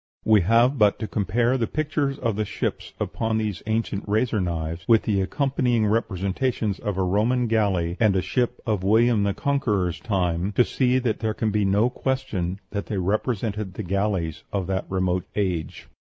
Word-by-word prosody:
We 110 Hz, -2 st, +5 dB
have 120 Hz, +8 st, +3 dB
but 105 Hz, -1 st, +4 dB
to 110 Hz, -, -4 dB
compare 115 Hz, +6 st, +1 dB
the 115 Hz, -, 0 dB
pictures 145 Hz, -2 st, -1 dB
of 115 Hz, -6 st, -1 dB
the 110 Hz, -, 0 dB
ships 100 Hz, -, -4 dB
upon 110 Hz, -1 st, -1 dB
these 105 Hz, -3 st, -2 dB
ancient 110 Hz, -2 st, -1 dB
razor 110 Hz, 0 st, +1 dB
knives 85 Hz, -1 st, -3 dB
with 115 Hz, -2 st, +5 dB
the 100 Hz, -3 st, +1 dB
accompanying 125 Hz, 0 st, +1 dB
representations 105 Hz, +1 st, -1 dB
of 105 Hz, -3 st, -3 dB
a 95 Hz, -, +1 dB
Roman 110 Hz, +7 st, +1 dB
galley 100 Hz, -6 st, +1 dB
and 110 Hz, -4 st, +3 dB
a 95 Hz, -, +2 dB
ship 125 Hz, -1 st, -1 dB
of 105 Hz, -5 st, 0 dB
William 110 Hz, +2 st, +4 dB
the 100 Hz, -1 st, 0 dB
Conqueror's 105 Hz, -, 0 dB
time, 90 Hz, -2 st, -1 dB
to 120 Hz, -, +4 dB
see 130 Hz, -1 st, +1 dB
that 120 Hz, -4 st, -1 dB
there 110 Hz, -1 st, -1 dB
can 110 Hz, -1 st, 0 dB
be 105 Hz, 0 st, +1 dB
no 105 Hz, +5 st, +2 dB
question 110 Hz, -10 st, -2 dB
that 100 Hz, -1 st, -4 dB
they 105 Hz, -, -3 dB
represented 105 Hz, 0 st, -1 dB
the 110 Hz, -, -4 dB
galleys 95 Hz, -4 st, -1 dB
of 100 Hz, -2 st, -1 dB
that 95 Hz, +1 st, -2 dB
remote 95 Hz, -1 st, 0 dB
age. 90 Hz, -7 st, -2 dB
105 Hz, 180 wpm, -24 LUFS, 95-115 Hz, -, We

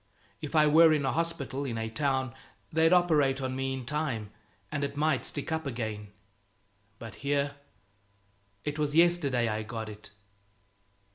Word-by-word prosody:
If 150 Hz, +1 st, -5 dB
I 155 Hz, -1 st, +6 dB
were 160 Hz, +2 st, +7 dB
in 145 Hz, -3 st, +1 dB
a 135 Hz, -, +1 dB
hospital, 145 Hz, -5 st, -2 dB
in 120 Hz, -5 st, -3 dB
a 110 Hz, 0 st, -2 dB
town, 130 Hz, +1 st, -1 dB, 0.4 s
they'd 160 Hz, +1 st, +4 dB
operate 155 Hz, -7 st, +4 dB
on 130 Hz, -1 st, -3 dB
me 135 Hz, 0 st, -1 dB
in 130 Hz, -2 st, -6 dB
time, 130 Hz, -7 st, -2 dB, 0.4 s
and 145 Hz, -1 st, -2 dB
it 140 Hz, 0 st, -3 dB
might 150 Hz, -3 st, +1 dB
stick 145 Hz, -, -4 dB
up 160 Hz, -2 st, -1 dB
again. 110 Hz, -4 st, -4 dB, 0.9 s
But 115 Hz, -2 st, -9 dB
here! 145 Hz, +1 st, -1 dB, 1.1 s
It 150 Hz, +1 st, -3 dB
was 150 Hz, 0 st, 0 dB
yesterday 160 Hz, -8 st, +3 dB
I 110 Hz, 0 st, -1 dB
got 110 Hz, 0 st, -5 dB
it. 105 Hz, 0 st, -11 dB
140 Hz, 155 wpm, -29 LUFS, 120-155 Hz, 1.1 s, were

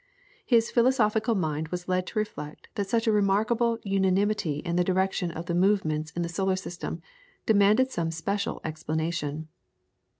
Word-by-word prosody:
His 230 Hz, -2 st, +3 dB
philosophical 230 Hz, -2 st, +2 dB
mind 155 Hz, -4 st, -1 dB
was 175 Hz, +2 st, -5 dB
led 185 Hz, 0 st, 0 dB
to -, -, -7 dB
reflect 155 Hz, -8 st, -4 dB
that 200 Hz, -2 st, -3 dB
such 230 Hz, +1 st, +1 dB
a 225 Hz, -, +3 dB
remarkable 215 Hz, +3 st, +2 dB
unanimity 195 Hz, -4 st, +1 dB
in 170 Hz, -1 st, -1 dB
the 180 Hz, -, +3 dB
direction 190 Hz, 0 st, 0 dB
of 165 Hz, 0 st, -6 dB
the 170 Hz, -, -2 dB
movements 170 Hz, -5 st, +1 dB
in 175 Hz, -, -1 dB
the -, -, -2 dB
solar 190 Hz, +3 st, 0 dB
system 175 Hz, -2 st, -6 dB, 0.4 s
demanded 215 Hz, +5 st, +4 dB
some 170 Hz, -6 st, -1 dB
special 200 Hz, +5 st, -2 dB
explanation. 155 Hz, -1 st, -3 dB
190 Hz, 155 wpm, -27 LUFS, 165-210 Hz, 0.4 s, demanded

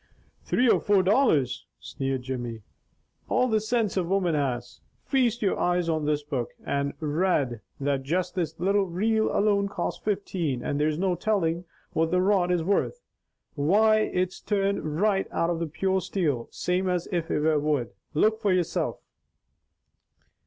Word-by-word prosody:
"Three 250 Hz, -, +2 dB
or -, -, +5 dB
four 200 Hz, -2 st, +3 dB
dollars," 185 Hz, -, +2 dB
sneered 135 Hz, -1 st, -3 dB
Jimmy. 120 Hz, -4 st, -5 dB, 0.7 s
"All 255 Hz, -, +3 dB
the 220 Hz, -3 st, +1 dB
sinse 220 Hz, -2 st, 0 dB
a 185 Hz, -, +2 dB
woman 180 Hz, -1 st, +1 dB
has! 135 Hz, -5 st, -2 dB, 0.2 s
Feast 240 Hz, -4 st, +1 dB
your 195 Hz, -, +1 dB
eyes 175 Hz, -1 st, +1 dB
on 155 Hz, -2 st, 0 dB
this 150 Hz, 0 st, 0 dB
book 135 Hz, -5 st, -4 dB
and 140 Hz, 0 st, -1 dB
rade 150 Hz, -, 0 dB, 0.2 s
that 140 Hz, -1 st, 0 dB
just 180 Hz, +6 st, -1 dB
this 165 Hz, -4 st, -3 dB
little 195 Hz, +2 st, +2 dB
reel 220 Hz, +5 st, +1 dB
alone 200 Hz, -1 st, +2 dB
cost 200 Hz, -, -4 dB
fifteen, 175 Hz, -, -2 dB
and 145 Hz, -, -1 dB
there's 150 Hz, 0 st, +1 dB
no 185 Hz, +1 st, +1 dB
telling 175 Hz, -3 st, 0 dB, 0.3 s
what 160 Hz, 0 st, +1 dB
the 180 Hz, +2 st, +2 dB
rod 185 Hz, -1 st, +2 dB
is 175 Hz, -2 st, +1 dB
worth. 200 Hz, -, 0 dB, 0.5 s
Why 205 Hz, +9 st, +4 dB
it's 185 Hz, -3 st, -1 dB
turned 195 Hz, -6 st, -1 dB
right 200 Hz, -1 st, +2 dB
out 165 Hz, +1 st, 0 dB
of 165 Hz, -2 st, -3 dB
pure 190 Hz, +2 st, 0 dB
steel, 150 Hz, -10 st, -1 dB
same 185 Hz, +1 st, -1 dB
as 180 Hz, -1 st, -1 dB
if 170 Hz, -3 st, -1 dB
it -, -, +1 dB
were 155 Hz, 0 st, +2 dB
wood. 145 Hz, -6 st, 0 dB, 0.2 s
Look 220 Hz, +7 st, +2 dB
for 205 Hz, -3 st, +2 dB
yoursilf." 180 Hz, -3 st, 0 dB
180 Hz, 160 wpm, -26 LUFS, 150-200 Hz, 0.7 s, or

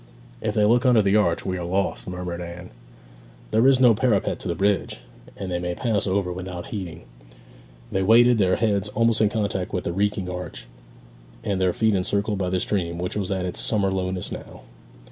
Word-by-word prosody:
'If -, -, -2 dB
they 105 Hz, -, +4 dB
look 120 Hz, +3 st, +4 dB
under 120 Hz, -5 st, +5 dB
the 100 Hz, +1 st, +2 dB
arch 85 Hz, -6 st, +2 dB
we 95 Hz, -1 st, -2 dB
are -, -, -4 dB
lost,' 95 Hz, +3 st, -1 dB
murmured 90 Hz, -1 st, -5 dB
Anne. 90 Hz, +1 st, -8 dB, 0.8 s
'There 110 Hz, +4 st, +4 dB
is 135 Hz, -1 st, +5 dB
no 125 Hz, -3 st, +6 dB
parapet 110 Hz, -3 st, +1 dB
to -, -, -6 dB
the 85 Hz, -, -1 dB
bridge, 100 Hz, -6 st, 0 dB, 0.4 s
and 95 Hz, -2 st, -5 dB
they 90 Hz, -, -1 dB
may 90 Hz, 0 st, -3 dB
pass 110 Hz, -3 st, 0 dB
over 95 Hz, -1 st, 0 dB
without 90 Hz, -1 st, -6 dB
heeding.' 90 Hz, -6 st, -6 dB, 0.9 s
They 95 Hz, -, 0 dB
waited, 115 Hz, +4 st, +5 dB
their 95 Hz, -2 st, +3 dB
heads 105 Hz, -2 st, 0 dB
almost 115 Hz, +1 st, +2 dB
in 105 Hz, -, +4 dB
contact 100 Hz, -4 st, -2 dB
with 90 Hz, -, -1 dB
the 85 Hz, -, -3 dB
reeking 100 Hz, 0 st, 0 dB
arch, 90 Hz, -6 st, -6 dB, 0.8 s
and 100 Hz, -4 st, -1 dB
their 90 Hz, -1 st, +3 dB
feet 110 Hz, +3 st, +1 dB
encircled 100 Hz, +2 st, 0 dB
by 90 Hz, -2 st, -1 dB
the 95 Hz, 0 st, 0 dB
stream, 85 Hz, -4 st, -1 dB
which 90 Hz, +1 st, -4 dB
was 100 Hz, -3 st, -2 dB
at 95 Hz, -2 st, -1 dB
its 90 Hz, -, -3 dB
summer 100 Hz, -3 st, +1 dB
lowness 95 Hz, -1 st, -2 dB
now. -, -, -9 dB
95 Hz, 200 wpm, -24 LUFS, 90-105 Hz, 0.9 s, no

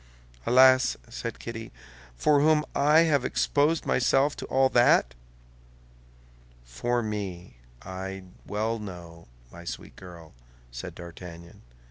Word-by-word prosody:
"Alas!" 130 Hz, +1 st, +5 dB
said 115 Hz, -1 st, -5 dB
Kitty, 115 Hz, -1 st, -7 dB, 0.4 s
"for 145 Hz, -, +3 dB
whom 150 Hz, +1 st, +3 dB
have 150 Hz, -1 st, +4 dB
I -, -, 0 dB
exposed 150 Hz, +3 st, +1 dB
myself 135 Hz, +3 st, +2 dB
to -, -, -7 dB
all 135 Hz, 0 st, +3 dB
that?" 120 Hz, -, +4 dB, 1.5 s
"For 120 Hz, -, -2 dB
me, 95 Hz, -, -5 dB, 0.3 s
I 95 Hz, +1 st, -6 dB, 0.2 s
well 110 Hz, +2 st, -2 dB
know, 85 Hz, -5 st, -10 dB, 0.2 s
my 85 Hz, -, -11 dB
sweet 85 Hz, -, -8 dB
girl," 85 Hz, -3 st, -13 dB, 0.4 s
said -, -, -8 dB
D'Artagnan. 85 Hz, 0 st, -11 dB
110 Hz, 110 wpm, -27 LUFS, 85-130 Hz, 1.5 s, Alas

